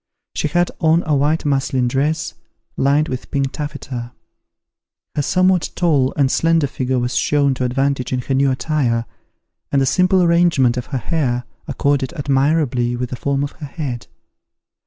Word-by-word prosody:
She - - -1
had 175 +4 +1
on 165 +1 +3
a 155 -1 +1
white 150 +4 +1
muslin 135 -3 +1
dress, 150 +5 -1 0.4
lined 145 +3 +2
with 130 -4 -5
pink 140 -1 -1
taffeta. 135 -5 -6 1.0
Her 145 - +1
somewhat 185 +3 +2
tall 145 -7 +2
and 135 -2 +3
slender 165 -2 +2
figure 130 -1 -2
was 125 +1 -1
shown 140 -1 +2
to 130 0 -2
advantage 135 0 -1
in 125 -1 0
her 135 - -3
new 135 +1 +3
attire, 130 -4 0 0.7
and 140 - +3
the 135 - +2
simple 180 +7 +3
arrangement 170 -8 +3
of 125 - -4
her 135 - -3
hair 125 -4 -1 0.2
accorded 140 0 0
admirably 140 -4 +1
with 125 0 -4
the - - -2
form 140 +2 -1
of 145 - -3
her 150 - -9
head. 135 -6 -5
140 Hz, 160 wpm, -19 LUFS, 130-155 Hz, 1.0 s, on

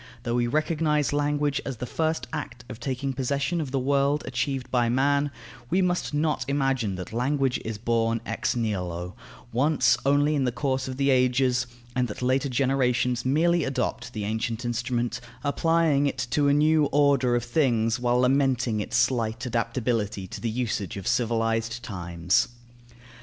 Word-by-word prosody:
Though 120 -2 -2
we 120 0 +1
recognize 150 +1 +1
language 145 0 0
as 135 -3 -5
the 125 - -4
first 160 +5 -1
act 145 -6 -6
of 110 - -8
taking 135 +2 -3
possession 140 +6 -1
of 145 - -4
the 135 - -1
world 140 +2 +1
achieved 135 -3 -2
by 120 -2 +2
man, 140 +3 +2 0.4
we 180 - +2
must 180 -1 0
not 150 -2 0
imagine 135 -7 0
that 90 +3 -7
language 135 +2 0
is 110 -1 -4
born 115 0 0
ex - - -1
nihilo, 90 -6 -2 0.4
once 130 0 +3
only 145 +2 +3
in 140 -3 +1
the 125 - +1
course 130 +1 -1
of 130 -1 -5
the 140 0 +2
ages, 125 -1 +2 0.3
and 125 -1 +1
that 110 +3 -6
later 130 +3 +1
generations 125 -1 +1
merely 165 +5 +3
adopt 130 -2 -2
the 105 - -4
ancient 110 +2 -2
instrument, 120 0 -2 0.2
applying 150 -1 +2
it 135 - -2
to 145 -1 +2
a 140 - +4
new 155 +1 +4
order 140 -4 +3
of 120 - 0
things 120 -6 +1
while 120 0 +2
lamenting 130 -3 +2
its 105 - -1
slight 115 -1 +1
adaptability 115 -4 -1
to 95 - -8
the 115 - -1
usage 110 -5 -2
of 95 - -7
civilized 115 0 0
times. 85 -5 0
130 Hz, 165 wpm, -26 LUFS, 115-140 Hz, 0.4 s, a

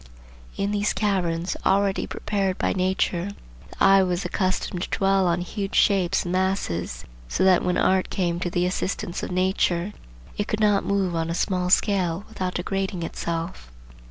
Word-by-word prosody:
In 200 +1 0
these 205 0 +1
caverns, 180 -4 0
already 195 0 +2
prepared 195 -3 -2
by - - 0
nature, 185 -1 0 0.4
the - - -3
eye 195 0 +7
was 180 -1 -1
accustomed 185 -2 -1
to - - -3
dwell 195 -1 +3
on 175 +1 +1
huge 195 +2 -4
shapes 195 -4 +3
and 175 - -4
masses, 180 - -1 0.2
so - - 0
that 185 -2 +5
when 180 0 +1
art 190 0 +2
came 175 -2 -1
to 180 - -2
the 175 0 0
assistance 180 -1 -2
of - - -4
nature 185 0 0 0.5
it 205 - 0
could 215 - -2
not 210 -2 +3
move 195 -3 0
on 165 0 -1
a 170 - -1
small 180 0 0
scale 185 -1 +2
without 185 -4 -4
degrading 190 0 -2
itself. 165 - -4
185 Hz, 165 wpm, -24 LUFS, 175-195 Hz, 0.5 s, eye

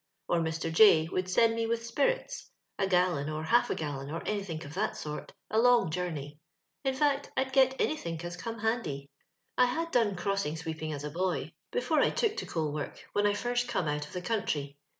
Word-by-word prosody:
Or 175 - +2
Mr. 160 0 -2
J 165 -4 +7
would 185 +1 -2
send 225 +5 +4
me 230 0 -1
with 230 0 -1
speirits - - -1
— - - -42
a 195 - +2
gallon, 180 -6 +2
or 155 0 -3
half 235 +10 +3
a - - 0
gallon, 140 -3 -4
or 165 +2 -5
anythink 195 -7 -3
of 145 - -9
that 185 - -1
sort 150 0 -6
— - - -55
a 220 - +3
loog 240 -7 +5
journey. 155 -4 -4 0.4
In 265 -1 0
fact, 285 0 +1
I'd 265 0 0
get 265 -1 +4
anythink 170 - -1
as 175 0 -4
come 230 +6 -5
handy. 205 - -2 0.2
" - - -51
I 250 - +8
had 330 +7 -2
done 225 -5 +2
crossing 185 -4 -1
sweeping 160 -1 -4
as 145 -1 -5
a 150 - -4
boy, 180 +3 -1 0.2
before 485 - +1
I - - +4
took 440 -2 0
to - - -4
coaLwork, 150 -3 -3 0.2
when 205 0 +3
I 205 - +2
first 245 +3 0
come 210 -9 -1
out 150 0 -1
of - - -14
the 180 -1 -4
countr}'. 170 -10 -1
185 Hz, 215 wpm, -30 LUFS, 155-230 Hz, 0.4 s, I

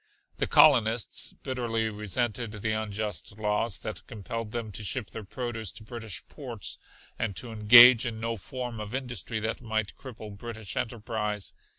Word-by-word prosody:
The - - +2
colonists 115 -6 +5
bitterly 115 -4 -2
resented 110 +2 -1
the 105 +1 -2
unjust 105 -3 -3
laws 105 0 0
that 110 - -6
compelled 115 0 -5
them 115 -2 -4
to 105 - -6
ship 105 +1 -3
their 110 - -6
produce 115 -2 -4
to 110 - -11
British 115 -3 -6
ports 120 - -6 0.4
and 105 -4 -1
to 120 +4 -4
engage 120 +3 +9
in 110 -2 -4
no 115 +1 -2
form 120 +1 -5
of 105 +3 -5
industry 125 -4 -2
that 110 +2 -2
might 110 -3 -1
cripple 110 -5 -9
British 110 -1 -7
enterprise. 105 -3 -2
110 Hz, 155 wpm, -28 LUFS, 105-120 Hz, 0.4 s, engage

